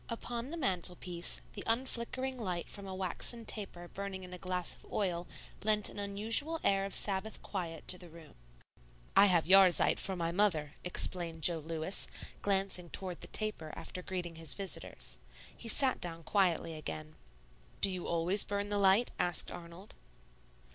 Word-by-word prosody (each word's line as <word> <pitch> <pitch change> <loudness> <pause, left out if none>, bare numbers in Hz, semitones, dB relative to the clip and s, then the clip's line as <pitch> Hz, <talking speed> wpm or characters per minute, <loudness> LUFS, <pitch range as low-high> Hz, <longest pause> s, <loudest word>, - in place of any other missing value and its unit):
Upon 235 +1 -4
the 335 - -5
mantel 180 - +2
piece, 175 -1 -2
the 205 - -6
unflickering 255 +2 -1
light 180 -6 -3
from 200 -1 -7
a 190 - -5
waxen 190 +5 -2
taper 190 -5 -4
burning 195 0 -6
in 180 0 -9
a 180 - -8
glass 180 -1 -2
of - - -13
oil 175 -4 -1 0.4
lent 210 -1 +2
an - - -8
unusual 225 +11 +1
air 195 0 +2
of 195 - 0
Sabbath 200 +2 -1
quiet 170 -5 -5
to 180 - +2
the 175 - -11
room. 165 -2 -14 0.8
"I 205 - +8
have 175 -4 +3
'Yahrzeit' 190 -1 +6
for 190 - -1
my 170 -1 -1
mother," 170 -6 +1
explained 170 -2 0
Jo 170 0 +5
Lewis, 160 +4 -1 0.3
glancing 195 -3 0
toward 185 -1 -3
the - - -6
taper 210 -8 -1
after 180 +3 -7
greeting 175 -3 -5
his 165 -2 -1
visitors. 195 -2 -3 0.4
He 235 - -8
sat 265 +3 +5
down 165 -1 -2
quietly 175 -3 +1
again. 80 - -6 0.6
"Do 195 - +5
you 180 -2 -4
always 170 +4 +5
burn 205 0 -3
the 205 0 +1
light?" 195 +4 +4
asked 175 -2 +3
Arnold. 175 +3 -9
185 Hz, 165 wpm, -33 LUFS, 170-205 Hz, 0.8 s, I